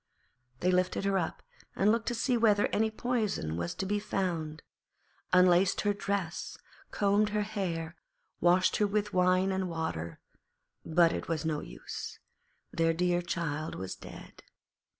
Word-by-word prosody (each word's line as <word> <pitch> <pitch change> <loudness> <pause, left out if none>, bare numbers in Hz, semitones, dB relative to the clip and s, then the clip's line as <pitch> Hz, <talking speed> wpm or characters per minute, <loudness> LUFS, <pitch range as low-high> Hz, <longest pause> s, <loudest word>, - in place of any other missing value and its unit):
They 180 - +3
lifted 185 +1 +1
her 195 -1 +2
up 165 - -4 0.3
and 205 +2 +4
looked 230 0 0
to 240 - 0
see 245 +2 +1
whether 215 -3 +4
any 220 +1 +1
poison 220 - -1
was 85 +1 -3
to - - -3
be 205 +2 0
found, 165 -6 -2 0.7
unlaced 180 +1 +5
her 205 -1 +2
dress, 200 -4 -3 0.3
combed 205 +1 +2
her 210 0 0
hair, 185 -6 -3 0.4
washed 180 +1 +4
her 210 - +3
with 210 0 -1
wine 185 +1 +3
and 190 -1 -1
water, 160 - -4 0.6
but 165 +1 +4
it - - -4
was 165 -1 -2
no 155 -2 0
use; - - -7 0.5
their 165 0 +2
dear 175 0 +1
child 165 -3 -3
was 95 0 -5
dead. - - -12
185 Hz, 150 wpm, -30 LUFS, 165-205 Hz, 0.7 s, unlaced